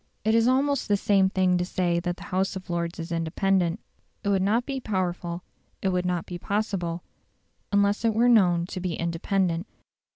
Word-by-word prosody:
It 220 - +3
is 230 +1 +4
almost 275 +2 +2
the 205 - +3
same 195 -1 +3
thing 185 -1 +2
to - - +1
say 175 -1 0
that 175 0 -3
the 195 - -10
House 190 +1 +1
of 185 -2 -7
Lords 170 0 -2
is 165 +1 -6
independent. 170 +2 +1 0.4
It 200 - 0
would 195 -1 +2
not 220 +6 +2
be 275 -1 -3
powerful, 180 -5 -2 0.4
it 190 - 0
would 180 -1 0
not 180 -2 -1
be 175 -1 -7
possible, 190 -4 -2 0.7
unless 200 +1 +2
it 225 -2 +2
were 235 +2 +4
known 180 -8 +4
to 185 - -6
be 180 -2 -2
independent. 170 +1 -1
185 Hz, 190 wpm, -26 LUFS, 175-205 Hz, 0.7 s, is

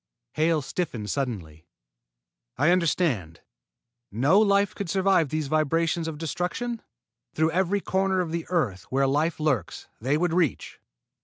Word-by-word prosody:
Hale 155 -1 +1
stiffened 130 - -3
suddenly. 90 - -4 0.9
"I 145 +6 +4
understand. 150 - 0 0.7
No 135 - +4
life 200 -2 +3
could 200 -4 -5
survive 190 -4 +2
these 155 +1 -2
vibrations 165 +2 +1
of 160 -2 -5
destruction? 180 - -3 0.5
Through 160 +1 +2
every 190 +3 +1
corner 190 0 0
of 175 -3 -1
the 170 0 -3
earth 120 - -1
where 135 +1 +2
life 150 +5 0
lurks, 135 - -1
they 135 +6 +1
would 175 0 0
reach?" 170 -5 -1
160 Hz, 135 wpm, -26 LUFS, 135-180 Hz, 0.9 s, I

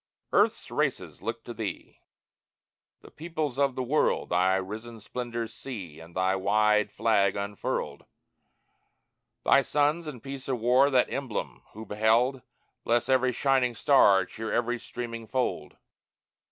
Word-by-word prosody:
Earth's - - +2
races - - -2
look 115 +3 -4
to 120 - -7
Thee: 110 -3 -6 1.0
The - - -15
peoples 155 -4 -4
of 140 -2 +2
the 130 - -2
world 145 +5 +1
Thy 90 +2 +3
risen 110 +5 -5
splendors 115 0 -5
see 95 - -8
And 85 +1 -14
thy 95 +1 +2
wide 105 +2 +2
flag 100 -4 +2
unfurled; 100 0 -3 1.4
Thy 140 - +6
sons, 150 +4 +1
in 140 -5 -6
peace 135 +2 -8
or 130 - +1
war, 125 +4 +4
That 130 -3 +2
emblem 105 - -4
who 110 +1 -8
behold, 115 +5 +2 0.4
Bless 120 +2 +1
every 130 -1 +3
shining 125 -1 +1
star, 100 -9 +5
Cheer 110 +4 -6
every 120 0 0
streaming 115 -2 -7
fold! 130 0 -2
115 Hz, 135 wpm, -28 LUFS, 105-130 Hz, 1.4 s, Thy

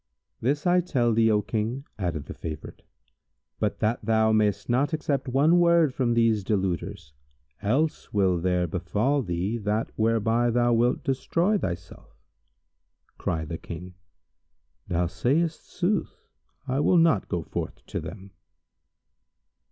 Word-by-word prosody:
"This 145 +5 0
I 180 0 +4
tell 125 -10 +1
thee, 115 0 +4
O 105 -1 +2
King," 115 +6 -2
added 85 -6 -2
the - - -7
favourite 80 -1 -7 0.8
"but - - 0
that 110 +2 0
thou 110 -1 +3
mayst 105 -2 +1
not 130 +6 +1
accept 145 -3 -1
one 145 +7 +4
word 170 -5 +4
from 120 -3 +1
these 115 -3 +3
deluders; 95 -5 -2 0.5
else 140 +10 0
will 95 -4 +2
there 90 0 +1
befal 105 - 0
thee 95 +2 -2
that 105 +1 -1
whereby 115 +2 +2
thou 120 0 +2
wilt 120 +3 +2
destroy 165 +8 +1
thyself." 90 - -6 1.0
Cried 80 -2 -2
the 80 - -4
King, 90 +2 -8 0.9
"Thou 90 0 0
sayst 155 - -1
sooth; 185 +1 -2 0.4
I 130 +1 0
will 175 +4 +4
not 165 - +3
go 85 -2 -2
forth - - -6
to - - -4
them." 100 -1 -9
115 Hz, 135 wpm, -26 LUFS, 95-140 Hz, 1.0 s, I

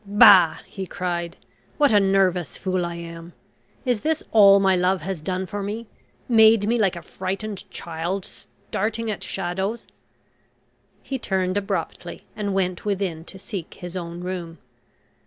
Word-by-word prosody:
"Bah," 200 -5 +7
he 190 -2 -7
cried. 175 -1 -3 0.4
"What 290 -6 +4
a 205 - +7
nervous 190 -7 +1
fool 185 -2 -1
I 170 - -5
am! 170 0 -9 0.5
Is 245 -5 +1
this 315 0 0
all 200 -2 +8
my 190 -1 +4
love 180 0 +1
has 185 -1 -4
done 185 +3 -2
for 205 +3 -5
me 210 +4 -4 0.4
made 220 -3 +6
me 235 +1 +2
like 195 -4 +2
a 170 - -8
frightened 195 +3 -5
child, 170 +3 -4
starting 220 +2 -4
at 210 - -5
shadows?" 190 +5 -3 1.2
He 265 -1 -4
turned 190 -4 -1
abruptly, 205 -1 -3
and 200 -2 -2
went 185 -2 -1
within 190 -6 -2
to 190 - -10
seek 190 -3 -6
his 175 0 -8
own 170 -1 -5
room. 175 -2 -5
190 Hz, 150 wpm, -23 LUFS, 175-205 Hz, 1.2 s, all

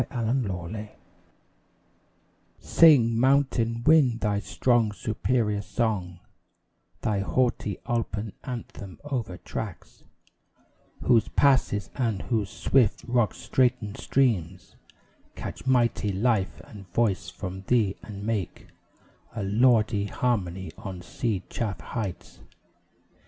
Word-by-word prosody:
Basil 115 -2 -1
Moss 105 -3 -3 1.7
Sing, 120 -9 +5
mountain 125 -3 +2
wind, 140 -7 +4
thy 105 -1 +1
strong, 120 0 +1
superior 110 0 -1
song 100 -6 -2 0.8
Thy 105 -2 0
haughty 105 -2 0
alpine 110 -3 -2
anthem, 115 -7 -7
over 120 -11 -3
tracts - - -7 1.0
Whose 115 -4 +4
passes 130 - +2
and 115 -7 -1
whose 110 -5 -1
swift, 125 -2 +2
rock 120 -5 +1
straitened 125 -5 0
streams 95 -10 0 0.6
Catch - - -7
mighty 120 -5 +2
life 100 0 0
and 100 -4 -13
voice 110 -5 +1
from 95 -1 -6
thee, 110 -6 +2
and 100 -2 -8
make 105 -5 -3 0.7
A 110 - -3
lordly 110 0 +3
harmony 95 -7 -2
on 95 -3 -7
sea 105 -1 -2
chafed 100 -8 -3
heights. 100 -7 -5
110 Hz, 100 wpm, -26 LUFS, 100-125 Hz, 1.7 s, Sing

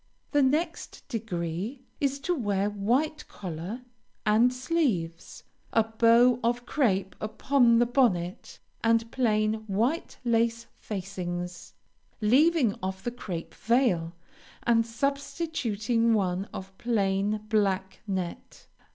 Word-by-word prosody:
The 290 - +4
next 315 +5 -1
degree 210 - -4
is 280 0 0
to 360 - 0
wear 205 - 0
white 250 +10 0
collar 185 +5 -6 0.4
and 225 +4 +5
sleeves, 250 - -2 0.3
a 225 - +5
bow 230 +2 +4
of 240 +1 0
crape 200 -9 +1
upon 235 +2 +3
the 240 - +4
bonnet, 210 -9 0 0.3
and 230 0 +2
plain 215 -3 +1
white 230 - -1
lace 230 0 +1
facings, 180 -3 -5 0.4
leaving 255 +1 +4
off 190 +1 -4
the 240 - -2
crape 185 -8 -6
veil, 195 -9 +1 0.5
and 230 -1 +3
substituting 235 -4 0
one 190 -2 0
of 190 0 -8
plain 205 -2 0
black 195 -3 0
net. 185 -3 -5
225 Hz, 110 wpm, -28 LUFS, 195-245 Hz, 0.5 s, and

